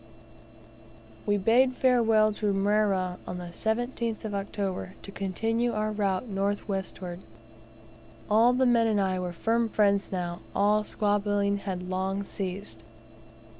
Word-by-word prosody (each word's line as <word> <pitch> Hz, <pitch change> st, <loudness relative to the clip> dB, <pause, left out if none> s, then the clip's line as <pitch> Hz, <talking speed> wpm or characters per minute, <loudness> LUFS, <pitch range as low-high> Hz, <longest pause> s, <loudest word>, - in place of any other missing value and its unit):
We 205 Hz, 0 st, +3 dB
bade 245 Hz, +6 st, +3 dB
farewell 225 Hz, -4 st, +4 dB
to 210 Hz, 0 st, -1 dB
Mrera 195 Hz, -2 st, +1 dB
on 180 Hz, -, -4 dB
the 175 Hz, -1 st, -6 dB
17th 230 Hz, +2 st, -2 dB
of 210 Hz, -, -4 dB
October, 195 Hz, -2 st, -3 dB
to 200 Hz, -, -8 dB
continue 225 Hz, +5 st, -1 dB
our 215 Hz, 0 st, -1 dB
route 200 Hz, +1 st, -1 dB
north 200 Hz, 0 st, -1 dB
westward. 185 Hz, -3 st, -4 dB, 1.1 s
All 225 Hz, +4 st, +5 dB
the 260 Hz, +1 st, +2 dB
men 235 Hz, -2 st, +4 dB
and 215 Hz, -2 st, +2 dB
I 190 Hz, -1 st, +1 dB
were 180 Hz, -1 st, -3 dB
firm 225 Hz, +6 st, 0 dB
friends 200 Hz, -2 st, +2 dB
now; 175 Hz, -2 st, -3 dB, 0.2 s
all 210 Hz, +1 st, +3 dB
squabbling 205 Hz, -1 st, 0 dB
had 190 Hz, -3 st, -4 dB
long 190 Hz, +2 st, -1 dB
ceased. 185 Hz, -, -6 dB
205 Hz, 130 wpm, -28 LUFS, 190-220 Hz, 1.1 s, All